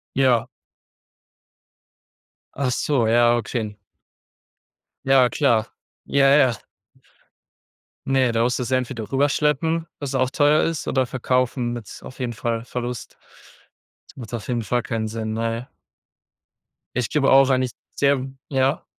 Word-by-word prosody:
Ja. 125 -3 +3 2.1
Ach 135 -2 0
so, 125 -2 +1
ja, 120 +1 +4
okay. 110 -2 -3 1.3
Ja 135 -2 +5
klar. 120 -5 +2 0.4
Ja, 140 -1 +2
ja. 135 -3 +5 1.5
Ne, 130 -3 +2
da 115 0 +2
musst 125 +2 0
du 125 - -2
sie 130 - 0
entweder 120 -4 -3
rüberschleppen, 150 +4 +1
was 140 -2 -4
auch 130 -1 +1
teuer 145 +2 +3
ist 165 -3 -2
oder 130 -1 +1
verkaufen, 125 0 -1
mit 120 -4 -8
auf 130 - -11
jeden 125 -2 -2
Fall 115 +1 -3
Verlust. 125 -1 -6 0.9
Das - - -18
macht 120 -3 -9
auf 115 -3 -5
jeden 120 -2 -1
Fall 120 +3 -1
keinen 110 -1 -2
Sinn, 110 0 -4
ne. 115 +2 -3 1.3
Ich 125 -2 -1
gebe 145 -3 +2
auch 135 0 +6
eigentlich 130 -1 +1 0.2
sehr 140 -2 +2 0.2
ja? 135 0 +1
125 Hz, 130 wpm, -22 LUFS, 115-135 Hz, 2.1 s, auch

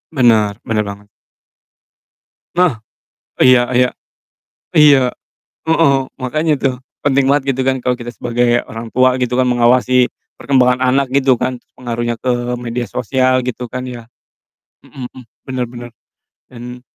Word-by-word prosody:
Benar 110 -5 +3
benar 110 -1 0
banget. 100 0 -10 1.5
Nah, 175 -11 +2 0.6
iya 125 -1 +6
iya. 125 0 +4 0.8
Iya. 140 -4 +5 0.5
Heeh, 160 -3 +3 0.3
makanya 155 +5 0
tuh 135 -2 +1 0.3
penting 140 -1 +2
banget, 140 0 +2
gitu 130 - -1
kan, 130 0 +1
kalo 125 0 0
kita 120 0 -8
sebagai 120 0 +1
orang 115 0 -8
tua, 130 0 +3
gitu 125 -1 -2
kan, 130 0 +2
mengawasi 125 +1 +3 0.3
perkembangan 125 -2 +2
anak, 135 -1 +1
gitu 135 -1 +3
kan, 125 0 -1
terus - - -30
pengaruhnya 120 -1 -3
ke 125 -1 -1
media 120 0 -3
sosial, 130 +2 0
gitu 125 0 -4
kan 125 +2 -6
ya. 120 -2 -9 0.8
Mhm 125 -2 -8
mhm, 130 - -14 0.3
bener 130 -2 -2
bener. 120 0 -9 0.6
Dan 125 0 -10
125 Hz, 140 wpm, -16 LUFS, 120-130 Hz, 1.5 s, iya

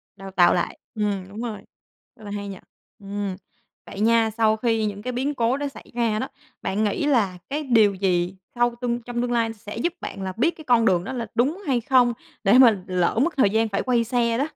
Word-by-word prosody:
Đào 195 0 -9
tạo 175 -2 +5
lại. 175 - -1 0.2
Ừm, 205 -3 -1
đúng 210 +3 -7
rồi, 230 -3 -4 0.6
rất 220 - -17
là 205 - -7
hay 205 0 -4
nhỉ. 195 -2 -7 0.4
Ừm, 200 -1 -4 0.5
vậy - - -9
nha, 225 +1 +3
sau 220 -1 +3
khi 225 -1 +1
những 205 -1 -4
cái 250 +2 -4
biến 270 +4 -1
cố 240 +2 +1
đó 290 0 -2
xảy 275 - -12
ra 225 -3 +1
đó, 260 - -2 0.3
bạn 205 +3 -1
nghĩ 215 +7 0
là 220 -11 +2
cái 300 +2 -2
điều 225 -6 +4
gì 185 -1 0 0.2
sau 240 0 +2
tương 240 -1 -1
trong 240 0 -3
tương 245 0 -1
lai 230 -2 +1
sẽ 210 0 -9
giúp 325 +9 -1
bạn - - -6
là 190 -1 -3
biết 315 +9 +3
cái 315 - -10
con 240 -3 +4
đường 180 -4 +3
đó 260 - -5
là 235 -3 -4
đúng 290 - +1
hay 250 -3 +2
không, 245 0 +4 0.3
để 215 +4 +5
mà 235 -5 +7
lỡ 180 +4 +1
mất 340 - 0
thời 235 -7 +5
gian 220 +2 +2
phải 200 - -1
quay 245 -2 +2
xe 235 -1 +1
đó? 270 - +1
225 Hz, 235 wpm, -24 LUFS, 200-245 Hz, 0.6 s, mà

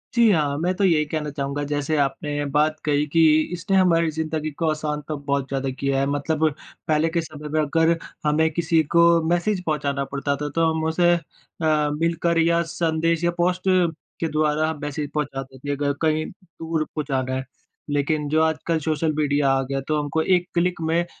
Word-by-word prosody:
जी, 235 -1 +5
हाँ। 145 -5 +1
मैं 180 +3 0
तो 200 - -1
यही 160 -5 +3
कहना 150 0 -3
चाहूँगा, 140 +1 -3
जैसे 145 +1 -1
आपने 145 +1 -1
बात 155 +1 +2
कही 150 0 +2
कि 165 +3 +2 0.3
इसने 190 +3 0
हमारी 170 -3 +3
ज़िंदगी 155 0 -3
को 160 - +2
आसान 150 -1 -2
तो 155 - -2
बहुत 140 -1 -2
ज़्यादा 135 0 -2
किया 140 -1 0
है, 135 - +2
मतलब 155 +2 +1 0.4
पहले 155 +1 +2
के 170 0 0
समय 150 -1 -9
में 155 +1 0
अगर 165 +3 +2 0.3
हमें 160 +2 +3
किसी 165 -1 +2
को 170 0 +7 0.2
मैसेज 180 +2 0
पहुँचाना 140 -3 -1
पड़ता 140 0 -1
था, 145 +1 -4
तो 165 +3 +1
हम 160 0 -2
उसे 175 +2 +3
अ, - - -2 0.7
मिलकर 170 +1 0
या 170 +1 +3
संदेश 165 0 0
या 170 - +3
पोस्ट 180 +1 +1 0.6
के 165 - 0
द्वारा 155 +1 +1
मैसेज 145 0 -4
पहुँचाते 135 -3 -4
थे, 145 +2 -5
अगर 140 0 0
कहीं 155 0 +1
दूर 165 -4 -5
पहुँचाना 135 -4 -3
है। 130 0 -3 0.4
लेकिन 145 +1 0
जो 155 +2 +3
आजकल 160 +1 0
सोशल 155 0 0
मीडिया 145 -2 +2
आ 135 0 +2
गया, 135 0 -1
तो 150 +2 -1
हमको 145 +2 -1
एक 180 0 +2
क्लिक 175 0 0
में 165 +2 +1
155 Hz, 185 wpm, -23 LUFS, 145-165 Hz, 0.7 s, को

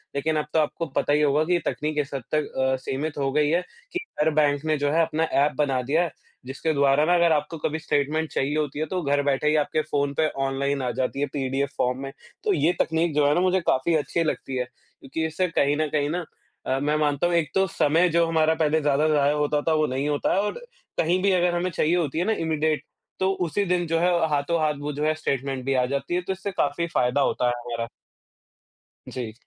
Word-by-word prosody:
लेकिन 155 +3 0
अब 150 - -1
तो 160 - +4
आपको 155 +2 -1
पता 145 - +2
ही 150 - +3
होगा 150 +1 +3
कि 180 - +1
ये 175 - +3
तकनीक 150 0 -2
इस 140 - -8
हद 135 -3 -4
तक 150 -1 -1
अ, 130 0 +2
सीमित 145 +4 -3
हो 135 -1 0
गई 150 +1 +2
है, 170 +3 +2 0.3
कि 360 - -2 0.2
हर 155 - +4
बैंक 145 -1 +2
ने 155 -1 +1
जो 145 0 0
है 165 +2 +3
अपना 160 0 -1 0.2
एप 150 - 0
बना 135 -4 +1
दिया 150 +7 +1
है, 170 - -3 0.3
जिसके 140 +5 -2
द्वारा 140 0 +3
ना 175 - +3
अगर 170 -1 +4
आपको 150 +2 0
कभी 155 +1 -2
स्टेटमेंट 155 +1 0
चाहिए 140 +2 0
होती 150 -1 -2
है, 155 - 0
तो 180 +3 -3
घर 145 -2 +1
बैठे 140 +1 +1
ही 150 - +3
आपके 155 +1 +1
फोन 140 -1 0
पे 155 - +4 0.2
ऑनलाइन 140 +1 -1
आ 125 - -1
जाती 130 +1 -1
है - - +3
पीडीएफ़ 135 0 -1
फॉर्म 125 +1 0
में। 135 - -5 0.3
तो 420 - +2
ये 175 - +2
तकनीक 165 0 +1
जो 150 -1 +4
है 145 - +4
ना 175 - +2
मुझे 185 0 +3
काफ़ी 130 +6 +2
अच्छी 160 +2 0
लगती 145 -4 -3
है, 125 - -1
क्योंकि 135 +4 -7
इससे 160 +4 -1
कहीं 145 -4 +1
न 155 - +1
कहीं 145 -1 0
ना 175 +2 -2 0.4
अ, 130 - 0
मैं 150 +2 0
मानता 150 +1 +1
हूँ 175 - -1
एक 165 -2 +1
तो 195 0 +4
समय 165 +1 +2
जो 170 0 +3
हमारा 160 -1 +3
पहले 160 -1 +1
ज़्यादा 145 +1 +2
ज़ाया 145 -1 +3
होता 150 0 0
था, 160 - +4
वो 155 0 +2
नहीं 135 +3 -2
होता 145 -1 0
है - - +2
और 210 - -3 0.4
कहीं 175 +3 +2
भी 200 - +4
अगर 180 -1 +2
हमें 175 +1 0
चाहिए 165 +1 +1
होती 160 -3 -1
है 175 - +1
ना 220 - +1
इमीडिएट 155 -2 0 0.4
तो 190 0 +2
उसी 185 +5 0
दिन 180 -1 +1
जो 165 +1 +1
है 175 +2 +3 0.2
हाथों-हाथ 150 +1 +1
वो 145 +1 -3
जो 145 +2 -3
है 155 - +3
स्टेटमेंट 135 -3 -2
भी 135 - +1
आ 130 -1 +2
जाती 140 +6 -2
है, 180 - +1
तो 185 +2 -3
इससे 190 +2 -5
काफ़ी 170 -1 -1
फायदा 125 +3 +2
होता 125 - +1
है 120 - +2
हमारा। 115 -1 -4 1.2
जी, 120 -4 -5
150 Hz, 245 wpm, -25 LUFS, 140-165 Hz, 1.2 s, तो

